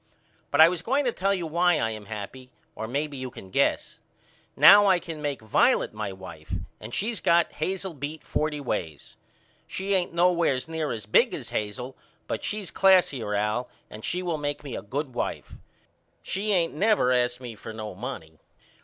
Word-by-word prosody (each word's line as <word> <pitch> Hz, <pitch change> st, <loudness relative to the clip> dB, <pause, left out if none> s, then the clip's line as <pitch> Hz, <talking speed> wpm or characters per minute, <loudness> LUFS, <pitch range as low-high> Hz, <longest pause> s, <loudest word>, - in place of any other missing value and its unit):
But 145 Hz, -, 0 dB
I 160 Hz, -, +10 dB
was 175 Hz, -1 st, -2 dB
going 270 Hz, +8 st, +1 dB
to 245 Hz, -, +2 dB
tell 195 Hz, -2 st, 0 dB
you 185 Hz, -4 st, -1 dB
why 170 Hz, +1 st, +2 dB
I 115 Hz, -4 st, 0 dB
am 110 Hz, -1 st, -7 dB
happy 110 Hz, +5 st, -7 dB, 0.2 s
or 110 Hz, -, -5 dB
maybe 140 Hz, +3 st, -3 dB
you 130 Hz, 0 st, -5 dB
can 95 Hz, -5 st, -12 dB
guess. -, -, 0 dB, 0.6 s
Now 205 Hz, +1 st, +8 dB
I 190 Hz, -2 st, +5 dB
can 165 Hz, -3 st, -7 dB
make 140 Hz, -6 st, -3 dB
Violet 110 Hz, -, +2 dB
my 105 Hz, -2 st, -4 dB
wife 90 Hz, -5 st, -8 dB, 0.2 s
and 110 Hz, -, -9 dB
she's 220 Hz, -, -2 dB
got 170 Hz, 0 st, +3 dB
Hazel 190 Hz, +2 st, -3 dB
beat 145 Hz, +2 st, -6 dB
forty 150 Hz, -1 st, -1 dB
ways. 90 Hz, -, -4 dB, 0.5 s
She 195 Hz, +1 st, -2 dB
ain't 185 Hz, -2 st, +1 dB
nowheres 170 Hz, -6 st, +2 dB
near 160 Hz, -2 st, -2 dB
as 110 Hz, -3 st, -5 dB
big 105 Hz, -, +3 dB
as -, -, -7 dB
Hazel 125 Hz, +5 st, -4 dB, 0.3 s
but -, -, -4 dB
she's 210 Hz, -3 st, -4 dB
classier 145 Hz, -, +3 dB
Al 105 Hz, +4 st, -1 dB, 0.2 s
and 105 Hz, 0 st, -10 dB
she 180 Hz, +1 st, -2 dB
will 170 Hz, -3 st, -2 dB
make 145 Hz, 0 st, -3 dB
me 135 Hz, -5 st, -6 dB
a -, -, -4 dB
good 130 Hz, +5 st, -4 dB
wife. -, -, -4 dB, 0.7 s
She 205 Hz, +3 st, -2 dB
ain't 170 Hz, -4 st, +2 dB
never 200 Hz, -, +3 dB
asked 125 Hz, 0 st, +1 dB
me 125 Hz, -3 st, -7 dB
for 110 Hz, -, -9 dB
no 110 Hz, -2 st, -6 dB
money. 90 Hz, -, -7 dB
145 Hz, 185 wpm, -26 LUFS, 110-175 Hz, 0.7 s, I